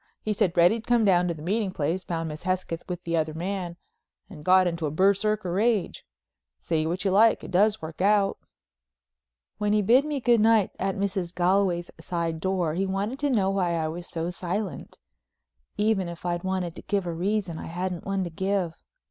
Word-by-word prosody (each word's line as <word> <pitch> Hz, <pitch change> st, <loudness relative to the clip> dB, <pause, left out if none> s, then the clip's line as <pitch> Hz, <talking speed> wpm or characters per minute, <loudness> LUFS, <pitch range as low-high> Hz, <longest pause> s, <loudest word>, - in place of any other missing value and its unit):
He 215 Hz, -, 0 dB
said 185 Hz, -3 st, 0 dB
Reddy'd 205 Hz, +7 st, +4 dB
come 240 Hz, -2 st, +3 dB
down 180 Hz, -2 st, +4 dB
to 170 Hz, -, -2 dB
the 150 Hz, -, -10 dB
meeting 205 Hz, +3 st, 0 dB
place, 175 Hz, +1 st, -2 dB
found 165 Hz, -2 st, -3 dB
Miss 150 Hz, 0 st, -7 dB
Hesketh 185 Hz, -2 st, -2 dB
with 180 Hz, 0 st, -5 dB
the 170 Hz, 0 st, -1 dB
other 155 Hz, -1 st, -1 dB
man 175 Hz, 0 st, -4 dB, 0.5 s
and 150 Hz, -, -10 dB
got 185 Hz, +2 st, +5 dB
into 170 Hz, -2 st, -1 dB
a -, -, -1 dB
Berserker 200 Hz, +3 st, +1 dB
rage. 210 Hz, -1 st, 0 dB, 0.5 s
Say 155 Hz, -, -1 dB
what 180 Hz, +4 st, -2 dB
you 195 Hz, -, +2 dB
like, 220 Hz, +4 st, +4 dB
it -, -, -8 dB
does 205 Hz, +1 st, +3 dB
work 160 Hz, +2 st, -7 dB
out." 200 Hz, 0 st, +3 dB, 1.2 s
When 210 Hz, 0 st, +1 dB
he 210 Hz, -1 st, +3 dB
bid 245 Hz, +7 st, +5 dB
me 300 Hz, -2 st, -2 dB
good 240 Hz, -2 st, +3 dB
night 220 Hz, -3 st, +4 dB
at 195 Hz, 0 st, -1 dB
Mrs. 195 Hz, -3 st, -2 dB
Galway's 180 Hz, -1 st, +1 dB
side 170 Hz, -2 st, -3 dB
door 180 Hz, -3 st, 0 dB
he 190 Hz, +3 st, -1 dB
wanted 200 Hz, +7 st, -2 dB
to 290 Hz, -, 0 dB
know 200 Hz, -7 st, +2 dB
why 180 Hz, -3 st, 0 dB
I 160 Hz, -1 st, -1 dB
was 175 Hz, +2 st, -6 dB
so 165 Hz, +1 st, -3 dB
silent? 185 Hz, +2 st, -4 dB, 0.8 s
Even 210 Hz, -4 st, +1 dB
if 170 Hz, +1 st, -9 dB
I'd 175 Hz, 0 st, -1 dB
wanted 185 Hz, -3 st, -2 dB
to -, -, -7 dB
give 200 Hz, -2 st, -1 dB
a 170 Hz, -, -3 dB
reason 185 Hz, -1 st, -1 dB
I -, -, -7 dB
hadn't 180 Hz, +1 st, -4 dB
one 195 Hz, -1 st, -1 dB
to 175 Hz, -, -5 dB
give. 190 Hz, -1 st, -2 dB
185 Hz, 200 wpm, -26 LUFS, 170-200 Hz, 1.2 s, got